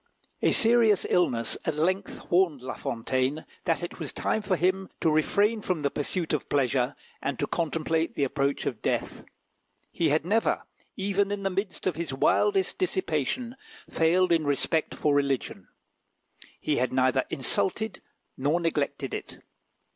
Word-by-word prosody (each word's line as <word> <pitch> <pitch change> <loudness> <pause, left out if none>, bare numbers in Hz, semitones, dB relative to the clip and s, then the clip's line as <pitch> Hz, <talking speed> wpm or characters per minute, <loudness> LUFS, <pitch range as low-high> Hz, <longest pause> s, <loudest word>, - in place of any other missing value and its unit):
A - - +3
serious 225 -3 +4
illness 120 -10 +1
at 160 - -1
length 185 +6 -2
warned 170 -7 +3
La 130 - -4
Fontaine 130 +6 -2 0.2
that 170 -1 0
it 175 - -6
was 155 -4 -3
time 220 - -1
for 190 -2 0
him 185 +2 0
to 165 - +2
refrain 205 +8 +2
from 180 -5 -1
the 140 -1 0
pursuit 160 +3 -2
of 150 - -2
pleasure, 135 -1 +1 0.3
and 140 - -2
to 145 - 0
contemplate 160 +1 -1
the 140 - 0
approach 140 +1 0
of - - -3
death. - - -2 0.7
He 165 -2 +1
had 155 +2 +1
never, 220 +5 +1 0.3
even 200 +1 +1
in 205 -1 -3
the 195 - 0
midst 195 +1 -3
of 180 -5 0
his 165 -5 -3
wildest 195 +7 +2
dissipation, 185 - -1 0.4
failed 175 +3 +3
in 165 -2 +3
respect 145 +2 +1
for 150 - +1
religion: 140 -2 -1 0.9
he 150 - 0
had 125 0 +1
neither 130 0 +2
insulted 190 - 0 0.3
nor 145 +6 +1
neglected 140 -5 -1
it. - - -6
160 Hz, 155 wpm, -27 LUFS, 140-190 Hz, 0.9 s, serious